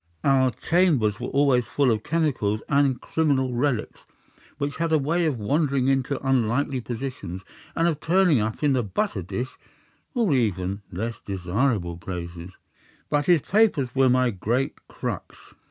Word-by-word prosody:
Our 135 -2 +4
chambers 135 - +1
were - - -4
always 135 -4 +2
full 140 -1 +2
of 110 -2 0
chemicals 125 -10 0
and 140 -2 +3
of 125 - -19
criminal 135 -5 0
relics 120 -2 -1 0.5
which 145 0 -3
had 165 0 -1
a 160 - +5
way 165 +4 +1
of 145 -5 -1
wandering 135 +3 +1
into 135 0 0
unlikely 130 +1 +1
positions, 115 -6 -6 0.3
and 165 - +2
of 160 -3 0
turning 175 -4 +3
up 110 +6 -3
in 145 -2 +4
the 130 - +2
butter 95 -1 -2
dish 100 +9 -5 0.6
or 230 -8 +2
in 135 - +4
even 100 -3 -1
less 115 +6 -4
desirable 95 -1 -1
places. 85 0 -7 0.5
But 145 -1 +1
his 175 -4 +5
papers 195 - +2
were 135 -1 +4
my 125 0 +3
great 115 +7 -1
crux. - - -7
130 Hz, 155 wpm, -25 LUFS, 105-145 Hz, 0.6 s, a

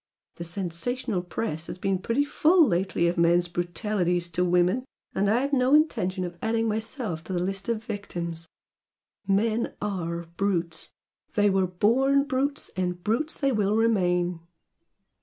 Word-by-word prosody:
The 170 - -5
sensational 185 +4 -3
press 170 -2 -3
has - - -6
been 190 0 0
pretty 230 +9 +1
full 325 +3 +4
lately 175 -2 +1
of 170 0 0
men's 175 +1 +4
brutalities 175 0 -1
to 175 +1 0
women, 180 +7 +2 0.3
and 200 +1 +1
I've 260 +6 +1
no 260 +1 +4
intention 185 - +1
of 175 -1 -6
adding 225 0 +1
myself 215 - -3
to 190 - -5
the 175 - 0
list 195 +4 -3
of 225 -1 -1
victims! 170 -6 -5 0.8
Men 215 +4 +1
ARE 170 -4 -3
brutes! 175 -5 -1 0.4
They 205 -1 +4
were 190 -1 +2
born 260 +10 +3
brutes, 280 +1 -2
and 180 -1 -2
brutes 240 +9 0
they 275 -2 +1
will 210 -3 +1
remain!" 180 -6 +2
195 Hz, 145 wpm, -26 LUFS, 175-230 Hz, 0.8 s, full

